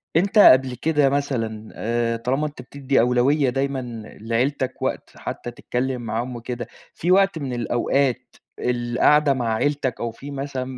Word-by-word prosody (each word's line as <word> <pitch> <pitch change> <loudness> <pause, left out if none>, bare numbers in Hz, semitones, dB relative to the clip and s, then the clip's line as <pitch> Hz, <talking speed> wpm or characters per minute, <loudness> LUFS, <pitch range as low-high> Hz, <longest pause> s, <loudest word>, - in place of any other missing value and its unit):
أنت 195 +5 +2
قبل 130 -7 +7
كده 150 +1 +2
مثلًا 115 -6 -2
آآ، 115 +1 -1
طالما 130 +6 -1
أنت 145 -3 -10
بتدّي 135 +1 -1
أولوية 125 +4 +3
دايمًا 135 +1 -1 0.4
لعيلتك 130 +3 -1
وقت - - -2
حتّى 120 - -6
تتكلم 125 +1 -3
معاهم 120 +3 -3
وكده، 120 0 -5 0.3
في 175 +3 -1
وقت 195 -2 +4
من 135 -3 -4
الأوقات 120 +3 0 0.2
القَعدة 125 +4 +2
مع 120 -4 -1
عيلتك 135 0 -1
أو 120 -1 -2
في 140 +5 -10
مثلًا 135 -2 -4
130 Hz, 145 wpm, -23 LUFS, 120-140 Hz, 0.4 s, قبل